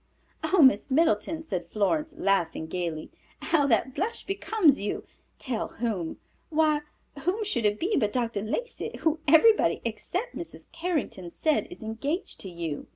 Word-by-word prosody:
"Oh, 320 +1 +4
Miss 260 -2 +5
Middleton," 315 +2 +2
said 180 - -4
Florence, 300 - 0
laughing 175 -5 +1
gayly, 165 -2 -4 0.3
"how 290 -4 +2
that 255 +1 +2
blush 445 - -2
becomes 390 -6 +3
you! 205 - -3 0.3
Tell 245 -5 -2
whom? 210 -9 -3 0.3
Why, 310 -1 +3 0.4
whom 365 +9 0
should 240 - +2
it 210 0 -1
be 395 +5 +1
but 210 -5 +2
Dr. 230 -4 -1
Lacey, 355 - -3
who 320 -1 +2
everybody, 420 +9 +6
except 360 - -3
Mrs. - - -7
Carrington, 325 - -2
says 310 - +1
is 355 - -9
engaged 280 - -3
to 190 - -6
you." 170 -4 -5
275 Hz, 150 wpm, -27 LUFS, 205-330 Hz, 0.4 s, everybody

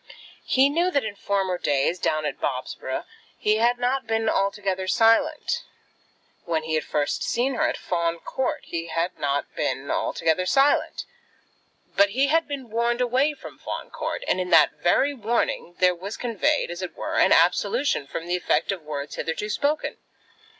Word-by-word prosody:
He 265 +1 +5
knew 335 +5 +1
that 285 -6 +1
in 215 -2 -4
former 195 -3 -1
days, 145 +5 +1
down 155 -1 0
at - - -3
Bobsborough, - - -3 0.3
he 215 0 +2
had 240 +2 +3
not 250 +1 -1
been 225 0 0
altogether 195 -2 -1
silent. 230 +10 +2 0.8
When 160 -2 -1
he 160 0 -3
had 155 - +1
first 145 -1 -1
seen 255 +3 0
her 315 +4 +1
at - - -3
Fawn 170 -1 -1
Court 260 +9 -3
he 165 0 -5
had 170 +2 -2
not 140 0 -1
been 140 +1 -2
altogether 165 +3 0
silent. 275 +5 +2 0.9
But 200 0 +5
he 265 +7 +1
had 325 +2 +2
been 270 -5 -6
warned 235 +1 +1
away 260 +5 +2
from - - -12
Fawn - - -6
Court, - - -4
and 185 - +1
in 180 - -4
that 165 -4 +6
very 270 +11 +3
warning 225 -7 -1
there 180 -1 +4
was 190 +4 -7
conveyed, 250 - 0
as 175 +1 -6
it 185 - -5
were, - - -4
an - - +4
absolution 285 - +3
from 165 - -5
the 175 +1 0
effect 170 -2 +1
of 190 -3 -4
words 150 -1 -5
hitherto 165 +6 -3
spoken. 295 +6 -1
200 Hz, 170 wpm, -24 LUFS, 170-260 Hz, 0.9 s, that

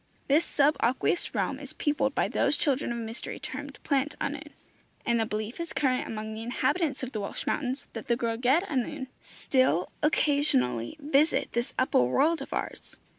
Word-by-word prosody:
This 295 +4 +5
sub 295 -2 +3
aqueous 260 +8 +1
realm - - 0
is - - -8
peopled 290 -2 0
by - - +2
those - - +2
children 280 -4 +1
of 235 - -2
mystery 225 0 -5
termed 285 +1 -6
Plant 280 +1 +1
Annwn, 290 +1 -3 0.6
and 235 -1 +2
the 225 - +1
belief 215 +4 -4
is 335 -1 -4
current 255 -3 +1
among 215 0 -4
the 220 - -6
inhabitants 265 +5 0
of 255 - -3
the 215 - -3
Welsh 200 - -4
mountains 265 -1 -1
that 225 - -6
the 235 - +3
Gwragedd 245 +7 +2
Annwn 275 - -2 0.2
still 255 - +1
occasionally 280 - +2
visit 295 +1 +2
this 235 +1 -1
upper 255 - +3
world 290 - +3
of - - -7
ours. - - -5
260 Hz, 175 wpm, -28 LUFS, 230-290 Hz, 0.6 s, This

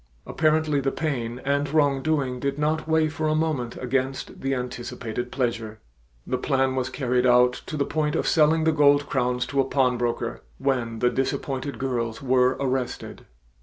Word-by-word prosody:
Apparently 155 -2 +1
the 135 0 0
pain 125 -6 -3
and 140 +1 +1
wrongdoing 140 -3 +1
did 140 +1 -2
not 155 +1 0
weigh 160 0 +3
for 155 0 -2
a 155 - +2
moment 155 -7 -1
against 130 +1 -2
the 135 0 0
anticipated 125 -1 -5
pleasure. 115 -4 -2 0.5
The 130 - -2
plan 135 -1 +1
was 130 -1 -1
carried 125 -1 +1
out 125 0 +4
to 155 - -4
the 140 - +1
point 150 -1 -1
of - - 0
selling 160 0 +4
the 160 - +3
gold 145 -1 +4
crowns 125 -2 0
to 140 -1 +1
a - - +2
pawnbroker 125 -3 0 0.2
when 125 -4 -1
the 125 +2 +2
disappointed 135 +1 -2
girls 120 -4 -2
were 130 -1 +2
arrested. 130 -2 -3
135 Hz, 165 wpm, -25 LUFS, 125-145 Hz, 0.5 s, out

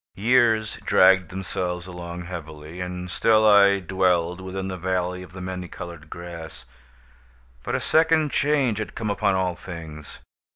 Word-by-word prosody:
—Years 110 0 +2
dragged 95 -2 +5
themselves 90 -1 -4
along 90 -1 -7
heavily, 80 -1 -8
and 90 0 -5
still 110 +2 +3
I 100 -1 +6
dwelled 90 -1 0
within 95 0 -5
the 95 - -4
Valley 90 0 -2
of 90 -1 -12
the 95 - -8
Many 90 -1 -5
Colored 85 -3 -9
Grass; 85 -6 -9 1.0
but - - -3
a - - +1
second 160 -2 +3
change 140 -7 +1
had 110 - -5
come 110 -2 -2
upon 100 -1 +1
all 90 -2 0
things. 80 -5 -9
90 Hz, 150 wpm, -24 LUFS, 85-100 Hz, 1.0 s, I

